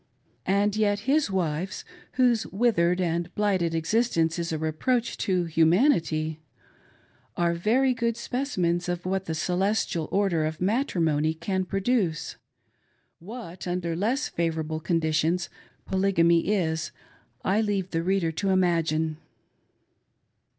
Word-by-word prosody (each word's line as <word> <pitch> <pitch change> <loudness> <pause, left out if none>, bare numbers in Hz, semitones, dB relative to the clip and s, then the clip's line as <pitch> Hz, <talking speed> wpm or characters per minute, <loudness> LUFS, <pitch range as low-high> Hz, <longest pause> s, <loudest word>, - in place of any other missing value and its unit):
And 200 +1 +2
yet 205 -1 +1
his 275 +2 +2
wives, 180 -1 -2 0.3
whose 245 -3 +2
withered 185 -5 +2
and 170 0 -1
blighted 190 -5 +1
existence 165 -2 +1
is 170 -1 -2
a 160 - -1
reproach 225 +11 -1
to 185 -4 +1
humanity, 160 - +2 1.0
are 170 -1 +2
very 240 +10 +2
good 235 -1 -1
specimens 185 -10 -1
of 175 0 -3
what 190 +1 -1
the 160 - -3
Celestial 180 0 0
Order 190 -6 +1
of 155 0 -4
Matrimony 165 - +1
can 185 +3 -2
produce. 195 -4 -1 0.8
What, 185 -2 -8
under 175 -2 -2
less 235 - 0
favorable 160 -2 -2
conditions, 165 +1 0 0.4
Polygamy 170 -4 +2
is, 160 -6 0 0.5
I 200 +4 +2
leave 200 -4 -1
the 165 - 0
reader 180 -1 +1
to 195 +5 -2
imagine. 165 -4 +1
180 Hz, 115 wpm, -26 LUFS, 165-205 Hz, 1.0 s, And